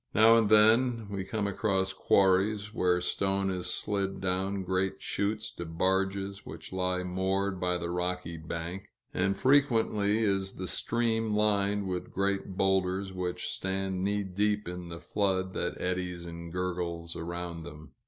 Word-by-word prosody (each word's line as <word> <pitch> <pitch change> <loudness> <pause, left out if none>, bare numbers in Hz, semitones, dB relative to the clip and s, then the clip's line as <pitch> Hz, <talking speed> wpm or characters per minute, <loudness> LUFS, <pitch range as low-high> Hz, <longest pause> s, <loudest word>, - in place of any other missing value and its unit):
Now 110 +2 +7
and 115 -2 +4
then 110 +1 +5
we 100 -1 -2
come 105 +2 -2
across 95 -2 0
quarries, 100 +2 +2
where 90 -4 +2
stone 95 +1 0
is 90 -1 -1
slid 100 -2 -1
down 95 +1 -1
great 95 +1 -1
chutes 105 +2 -2
to 85 - -4
barges 95 +3 0
which - - -9
lie 90 0 0
moored 95 +1 -1
by 90 -1 0
the 85 0 -4
rocky 90 -1 -2
bank; 85 +4 -5 0.3
and 95 +1 +1
frequently 115 -6 +3
is 95 -2 0
the 95 - -4
stream 115 -1 0
lined 105 -1 +2
with 90 -1 -4
great 100 -1 -1
boulders, 95 0 +1
which 90 -1 -3
stand 95 -1 -2
knee 100 +1 +1
deep 105 +2 0
in 90 -1 -6
the 85 0 -7
flood 95 -1 0
that - - -3
eddies 90 -1 -2
and 85 0 -8
gurgles 85 -2 -3
around 85 0 -5
them. 75 0 -10
95 Hz, 150 wpm, -30 LUFS, 90-100 Hz, 0.3 s, Now